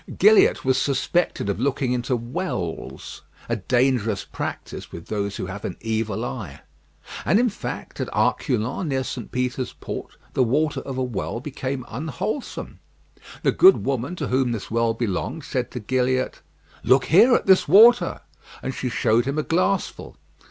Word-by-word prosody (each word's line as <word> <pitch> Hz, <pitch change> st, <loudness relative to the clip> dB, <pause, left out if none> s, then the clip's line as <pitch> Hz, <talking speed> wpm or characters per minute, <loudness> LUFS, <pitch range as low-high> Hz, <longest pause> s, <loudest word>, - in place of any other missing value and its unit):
Gilliatt 425 Hz, -, +5 dB
was 130 Hz, 0 st, +3 dB
suspected 140 Hz, -, 0 dB
of 100 Hz, -, -1 dB
looking 135 Hz, -2 st, 0 dB
into 125 Hz, +1 st, 0 dB
wells 115 Hz, -, -5 dB, 0.3 s
a 115 Hz, -, 0 dB
dangerous 120 Hz, -1 st, +1 dB
practice -, -, -6 dB
with 85 Hz, -, -10 dB
those 100 Hz, -2 st, -2 dB
who -, -, -4 dB
have 95 Hz, +2 st, -7 dB
an -, -, -4 dB
evil 110 Hz, -2 st, -2 dB
eye; 65 Hz, -, -6 dB, 0.6 s
and, 190 Hz, +8 st, +3 dB
in 245 Hz, 0 st, +3 dB
fact, 205 Hz, -, -6 dB
at -, -, -3 dB
Arculons, 125 Hz, -, 0 dB
near 135 Hz, -1 st, 0 dB
St. 125 Hz, -3 st, -6 dB
Peter's 125 Hz, 0 st, -2 dB
Port, -, -, -7 dB, 0.2 s
the -, -, +1 dB
water 145 Hz, +5 st, +1 dB
of 135 Hz, -2 st, -6 dB
a 130 Hz, -, 0 dB
well 120 Hz, -1 st, -3 dB
became 130 Hz, -1 st, -4 dB
unwholesome. 165 Hz, -, -5 dB, 0.6 s
The -, -, +4 dB
good 380 Hz, +1 st, +6 dB
woman 135 Hz, +5 st, -1 dB
to 150 Hz, -6 st, -4 dB
whom 130 Hz, -1 st, +1 dB
this 110 Hz, -, -6 dB
well 115 Hz, 0 st, +1 dB
belonged 120 Hz, -, -3 dB
said 130 Hz, -3 st, -2 dB
to 125 Hz, -, -6 dB
Gilliatt: 130 Hz, +3 st, 0 dB, 0.4 s
"Look 130 Hz, +3 st, +4 dB
here, 225 Hz, +9 st, +6 dB
at -, -, 0 dB
this 190 Hz, -1 st, +5 dB
water;" 225 Hz, +9 st, +6 dB, 0.4 s
and 130 Hz, -, -3 dB
she 125 Hz, -, -3 dB
showed 115 Hz, +1 st, +2 dB
him 140 Hz, +2 st, -2 dB
a 155 Hz, -, +1 dB
glassful. 185 Hz, +4 st, -1 dB
130 Hz, 160 wpm, -23 LUFS, 115-155 Hz, 0.6 s, good